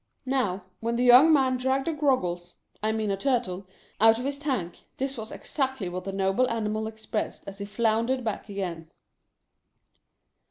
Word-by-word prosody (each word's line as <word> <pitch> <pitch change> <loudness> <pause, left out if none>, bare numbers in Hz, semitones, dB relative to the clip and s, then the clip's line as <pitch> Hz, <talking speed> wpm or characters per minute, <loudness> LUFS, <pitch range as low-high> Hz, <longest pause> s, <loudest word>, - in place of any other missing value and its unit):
Now, 215 -8 0 0.2
when 230 +1 -1
the 245 - +1
young 250 +6 +8
man 265 -4 +3
dragged 265 +2 0
a 330 - +1
Groggles 180 - 0
— - - -35
I 215 +1 +1
mean 220 -2 -1
a 195 - -1
Turtle 200 -6 -1 0.2
— - - -19
out 225 0 +7
of 245 - -4
his 280 0 -3
tank, 250 - -3
this 270 +1 -2
was 220 -3 -6
exactly 265 - -2
what 180 +1 -5
the 195 - -3
noble 195 +6 +1
animal 220 -1 -1
expressed 220 0 -4
as 200 0 -8
he 200 - -4
floundered 230 +4 0
back 220 -1 -4
again. 175 -5 -4
225 Hz, 175 wpm, -27 LUFS, 195-260 Hz, 0.2 s, young